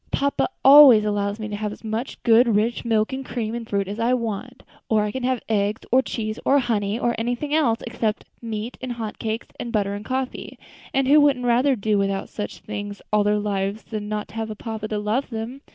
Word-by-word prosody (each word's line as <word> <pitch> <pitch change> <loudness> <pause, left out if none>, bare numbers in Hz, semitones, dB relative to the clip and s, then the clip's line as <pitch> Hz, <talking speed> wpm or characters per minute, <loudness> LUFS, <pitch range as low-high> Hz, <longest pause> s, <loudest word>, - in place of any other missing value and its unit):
"Papa 280 +5 0 0.2
always 270 -6 +9
allows 205 0 -1
me 215 - -4
to 210 - -4
have 210 0 -3
as - - -11
much 225 +4 -4
good, 230 -1 +5
rich 225 +3 0
milk, 220 +1 +1
and 265 0 -4
cream, 230 -4 -4
and 235 -1 -6
fruit 200 -1 0
as 205 +3 -5
I 240 +2 +2
want, 230 +1 -5 0.3
or 215 -2 +3
I 210 - -2
can 260 - -4
have 255 -1 -1
eggs, 210 -1 0
or 260 +2 +5
cheese, 215 -4 -4
or 280 - +4
honey, 220 -5 0
or 240 0 0
anything 245 +6 -2
else, 250 -8 +2
except 225 -2 -2 0.2
meat 225 0 -5
and 255 -1 -4
hot 225 -3 -6
cakes, 220 +1 -3
and 235 - -4
butter, 200 -3 0
and 205 +1 -6
coffee; 260 +2 -4 0.3
and 270 -1 +1
who 295 +2 +6
wouldn't 270 -4 +3
rather 250 +3 +3
do 210 -1 0
without 195 0 -1
such 210 - -6
things 205 -1 -6
all 210 -1 +4
their 210 0 +2
lives 205 0 -2
than 210 -2 -6
not 210 -1 -4
have 225 0 -4
a 215 - -5
papa 220 -1 -5
to 215 - -3
love 210 +6 -1
them? 235 +3 -6
225 Hz, 220 wpm, -23 LUFS, 210-245 Hz, 0.3 s, always